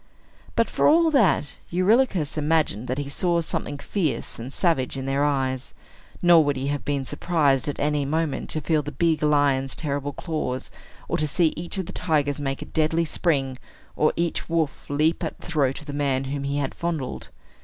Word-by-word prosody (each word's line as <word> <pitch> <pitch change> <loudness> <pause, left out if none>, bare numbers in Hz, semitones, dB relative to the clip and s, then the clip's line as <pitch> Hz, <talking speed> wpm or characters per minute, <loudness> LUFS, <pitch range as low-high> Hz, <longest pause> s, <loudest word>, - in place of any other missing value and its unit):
But, - - +3
for - - +2
all 325 +1 +5
that, 195 - +2
Eurylochus 185 - +2
imagined 150 -7 +1
that 130 - -2
he 145 -1 -3
saw 170 +4 +1
something 155 -3 -3
fierce 155 - -2
and 120 +3 -6
savage 140 -6 +1
in 135 - -4
their 135 +1 +1
eyes; 130 -3 -1 0.5
nor 170 -2 +7
would 145 -1 0
he 135 +1 -2
have 145 0 -2
been 140 -2 -1
surprised, 145 -3 +1
at 145 - -3
any 150 0 +1
moment, 155 +1 -1
to 155 - 0
feel 155 0 +1
the 145 0 -6
big 160 +3 +1
lion's 145 -3 +2
terrible 145 -2 -3
claws, 150 -7 -3 0.4
or - - 0
to 155 - 0
see 160 +2 +2
each 175 +4 -4
of 190 - -2
the - - -8
tigers 145 -4 0
make 135 -1 -2
a - - -11
deadly 160 +1 +1
spring, 135 -6 0 0.4
or 155 - +3
each 170 0 -2
wolf 160 -3 -1
leap 155 +3 +1
at - - -3
the - - -13
throat 145 -6 0
of - - -13
the 145 - -6
man 140 -2 0
whom 140 +1 -3
he 140 +1 -1
had 140 -2 -1
fondled. 165 -6 -4
145 Hz, 195 wpm, -24 LUFS, 140-165 Hz, 0.5 s, nor